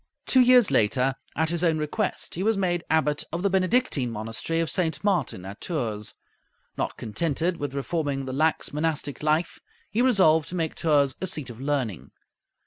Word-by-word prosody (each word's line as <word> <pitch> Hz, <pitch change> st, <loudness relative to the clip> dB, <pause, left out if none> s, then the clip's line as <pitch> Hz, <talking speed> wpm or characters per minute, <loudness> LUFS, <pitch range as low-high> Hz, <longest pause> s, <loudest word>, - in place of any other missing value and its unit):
Two 260 Hz, -, +4 dB
years 250 Hz, -3 st, +6 dB
later, 125 Hz, +5 st, +2 dB, 0.2 s
at 160 Hz, +1 st, +1 dB
his 170 Hz, 0 st, -1 dB
own 165 Hz, -2 st, +3 dB
request, 155 Hz, +7 st, -2 dB
he 175 Hz, -, -3 dB
was 220 Hz, +1 st, +2 dB
made 175 Hz, -3 st, 0 dB
Abbot 150 Hz, -2 st, +1 dB
of 170 Hz, +3 st, -3 dB
the 200 Hz, -, +2 dB
Benedictine 185 Hz, -, +1 dB
monastery 115 Hz, +9 st, -3 dB
of 165 Hz, -, +1 dB
St. 160 Hz, -5 st, 0 dB
Martin, 170 Hz, -, 0 dB
at 100 Hz, +2 st, -9 dB
Tours. 115 Hz, -, -3 dB, 0.6 s
Not -, -, -3 dB
contented 165 Hz, -, -1 dB
with 145 Hz, -3 st, -4 dB
reforming 140 Hz, -2 st, -2 dB
the 130 Hz, -, -5 dB
lax 155 Hz, +2 st, 0 dB
monastic 150 Hz, -2 st, -2 dB
life, 155 Hz, +3 st, 0 dB, 0.3 s
he 225 Hz, -, +1 dB
resolved 185 Hz, -, +4 dB
to 180 Hz, -, -5 dB
make 165 Hz, -3 st, -1 dB
Tours 145 Hz, -4 st, +2 dB
a 190 Hz, -, -1 dB
seat 150 Hz, -8 st, -3 dB
of 120 Hz, +2 st, -11 dB
learning. 135 Hz, -, -2 dB
155 Hz, 175 wpm, -25 LUFS, 135-175 Hz, 0.6 s, years